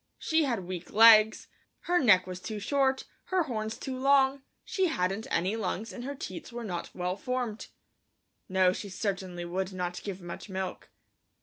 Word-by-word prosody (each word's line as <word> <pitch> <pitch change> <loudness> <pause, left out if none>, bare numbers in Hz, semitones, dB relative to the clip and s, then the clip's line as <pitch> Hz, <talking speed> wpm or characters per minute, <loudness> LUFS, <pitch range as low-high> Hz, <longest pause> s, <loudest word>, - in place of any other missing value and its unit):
She 320 -1 +1
had 235 -9 -2
weak 180 -1 -6
legs, 220 0 +7 0.3
her 355 0 +2
neck 200 - +5
was 185 -1 -6
too 215 +3 -5
short, 265 +4 +1 0.2
her 375 -2 +1
horns 220 -6 -4
too 265 - -5
long, 270 +1 +3 0.2
she 380 -4 +1
hadn't 195 - -1
any 185 +6 0
lungs 225 0 -3
and 245 - -7
her 280 +1 -4
teats 185 -4 -7
were 240 0 -6
not 180 -5 -4
well 180 0 -2
formed. 245 0 -3 0.8
No, 185 -1 +4
she 200 - -6
certainly 185 -3 -3
would 185 +2 -3
not 180 -1 -3
give 195 -2 -5
much 175 +3 -8
milk. 190 -1 -5
215 Hz, 170 wpm, -29 LUFS, 185-260 Hz, 0.8 s, legs